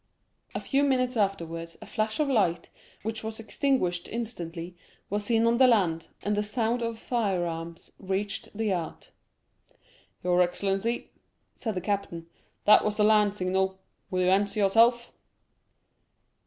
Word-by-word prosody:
A - - 0
few 275 0 +1
minutes 255 -3 +2
afterwards 170 -5 -2
a - - -10
flash 215 +1 -2
of 300 - +2
light, 195 -10 +1 0.3
which 220 +1 -3
was 220 0 -5
extinguished 220 -7 0
instantly, 175 -7 -5 0.4
was 205 0 -1
seen 225 0 +2
on 230 0 +3
the 260 0 +7
land, 170 -9 +2 0.2
and 205 0 0
the 205 - +1
sound 225 +3 0
of 230 -1 -2
firearms 175 -8 -2
reached 195 +1 -3
the 225 - -1
yacht. 180 -6 -3 1.1
"Your 180 0 +3
excellency," 195 +6 -1 0.4
said 220 -4 -4
the 185 - -2
captain, 195 -4 -3 0.4
"that 210 - +7
was 210 -1 -1
the 210 - +3
land 210 -1 +4
signal, 190 0 0 0.3
will 185 0 0
you 180 - +3
answer 200 +1 +2
yourself?" 230 +4 +4
205 Hz, 140 wpm, -28 LUFS, 180-225 Hz, 1.1 s, the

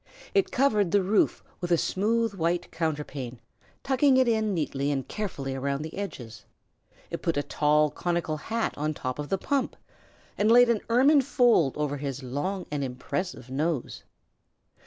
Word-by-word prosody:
It 395 -2 +3
covered 220 -9 +2
the 200 +2 +3
roof 200 +3 +2 0.2
with 175 - -4
a 170 - +5
smooth 225 +6 0
white 175 -1 -1
counterpane, 145 -6 -3 0.5
tucking 270 0 +3
it 260 -1 +4
in 220 -2 +1
neatly 145 -5 -1
and 135 -2 -2
carefully 140 -11 -4
round 140 +2 -2
the 160 - -8
edges; 125 - -7 0.7
it - - -4
put 165 -3 0
a 145 - +1
tall 150 0 +2
conical 170 -3 -2
cap 225 +7 -2
on 155 +1 -1
top 130 +1 -4
of 145 - -4
the 195 - +1
pump, 275 +6 -1 0.6
and 210 +2 +4
laid 245 +1 +7
an 220 - 0
ermine 275 +5 +5
fold 240 - +3
over 145 -1 -1
his 140 -1 -5
long 160 +10 -3
and 145 -1 -1
impressive 135 +2 -4
nose. 150 0 -2
170 Hz, 160 wpm, -27 LUFS, 145-220 Hz, 0.7 s, laid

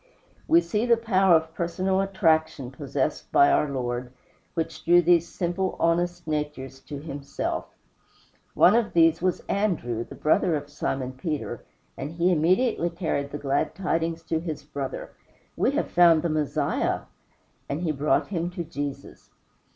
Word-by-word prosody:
We 170 - +6
see 210 +8 -1
the 235 -1 +5
power 195 -6 +4
of 160 0 0
personal 185 +3 0
attraction 160 -8 +1
possessed 140 -1 -3
by 140 - +6
our 150 - +2
Lord, 125 -2 -3 0.4
which 165 -1 -3
drew 175 +1 +6
these 170 -1 +4
simple, 180 +1 -2
honest 175 +1 +1
natures 150 -4 -4
to 145 - -6
himself. 140 -1 -4 0.9
One 185 - +6
of 235 -2 +1
these 165 -1 +4
men 185 - +2
was 180 - -1
Andrew, 160 - -1
the - - -12
brother 160 +2 +2
of 145 0 -5
Simon 135 -3 -3
Peter, 150 +3 -4 0.3
and 145 +4 -6
he 175 +2 +2
immediately 175 +3 +2
carried 165 -5 -2
the 145 - -5
glad 145 +2 -1
tidings 165 -3 -1
to 160 0 -1
his 160 -3 -5
brother, 140 -2 -6 0.4
"We - - +2
have - - -1
found 170 -3 +5
the 170 - 0
Messiah;" 155 -2 0 0.7
and 145 +4 -2
he 170 -3 0
brought 150 +1 +1
him 175 -3 -2
to 175 -1 -5
Jesus. 145 -3 -7
165 Hz, 155 wpm, -25 LUFS, 145-175 Hz, 0.9 s, We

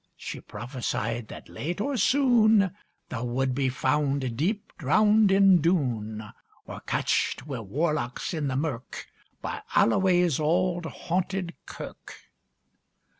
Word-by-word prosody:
She - - -7
prophesied 115 -1 -4
that, - - -10
late 175 +5 -5
or 280 +6 -1
soon, 225 -5 +4 0.4
Thou 125 -1 -4
would 130 +2 0
be 135 0 +1
found 135 -1 0
deep 195 - -2
drowned 210 +7 +4
in 195 -3 +6
Doon; 115 - 0 0.4
Or - - -8
catched 125 - -1
wi' 135 -5 -5
warlocks 130 - -2
in 155 -3 -1
the 130 - -2
mirk, 135 -4 -4 0.4
By - - -4
Alloway's 175 +3 +3
auld 175 +2 +1
haunted 180 +1 -2
kirk. - - -9
155 Hz, 120 wpm, -27 LUFS, 130-190 Hz, 0.4 s, in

